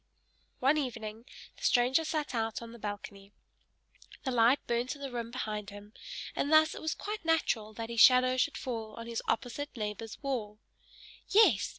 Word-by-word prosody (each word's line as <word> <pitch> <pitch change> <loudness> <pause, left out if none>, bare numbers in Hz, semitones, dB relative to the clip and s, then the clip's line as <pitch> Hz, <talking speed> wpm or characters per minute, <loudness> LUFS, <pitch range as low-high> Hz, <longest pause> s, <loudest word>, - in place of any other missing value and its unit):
One 280 +4 +3
evening 225 -4 -5 0.3
the - - -17
stranger 255 - +4
sat 305 -3 -2
out 225 -2 -1
on 230 - -9
the 235 - -12
balcony. 205 -1 -7 0.9
The 260 - -1
light 240 +2 +5
burnt 240 +3 -1
in 285 - -14
the 275 - -4
room 235 -1 -4
behind 215 -4 -4
him; 205 +1 -12 0.4
and 285 - -1
thus 315 0 +6
it - - -8
was 315 - -1
quite 420 -1 -5
natural 295 -10 +1
that 230 +1 -6
his 235 - -2
shadow 255 +2 +7
should 290 +4 +1
fall 225 -4 -5
on 230 - -7
his 230 -1 -3
opposite 250 +4 -2
neighbor's 210 0 -4
wall. 225 -7 -3 0.7
Yes! 350 - +5
235 Hz, 175 wpm, -31 LUFS, 220-275 Hz, 0.9 s, shadow